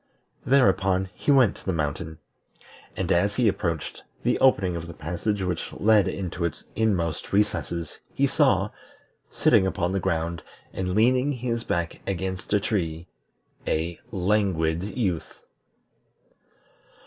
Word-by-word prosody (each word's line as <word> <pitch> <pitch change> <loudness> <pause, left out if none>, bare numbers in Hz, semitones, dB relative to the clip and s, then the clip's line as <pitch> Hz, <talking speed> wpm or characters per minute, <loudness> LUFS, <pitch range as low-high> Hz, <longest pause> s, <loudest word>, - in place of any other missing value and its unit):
Thereupon 95 -7 +3
he - - -5
went 130 -7 +5
to - - -16
the - - +2
mountain, 80 0 -3 0.8
and - - -1
as 100 +4 +2
he 125 -3 +3
approached 85 -6 -2 0.2
the - - +1
opening 100 -9 +3
of 85 0 -5
the 85 - -9
passage 90 +6 -2
which 90 -1 -3
led 105 -1 +4
into 90 -2 -3
its 85 -3 -3
inmost 90 -8 0
recesses 85 -5 -1
he - - +1
saw, - - +2 0.6
sitting 95 - +3
upon 90 -1 -1
the 95 - 0
ground, 85 -1 -1 0.3
and 90 -1 -2
leaning 125 +5 +3
his 120 -2 -2
back 85 -5 -2
against 95 -1 -3
a 105 - +4
tree, 85 -5 -2 0.6
a 85 +2 -1
Languid 90 -4 +1 0.2
Youth. 95 -9 -1
95 Hz, 130 wpm, -25 LUFS, 85-105 Hz, 0.8 s, went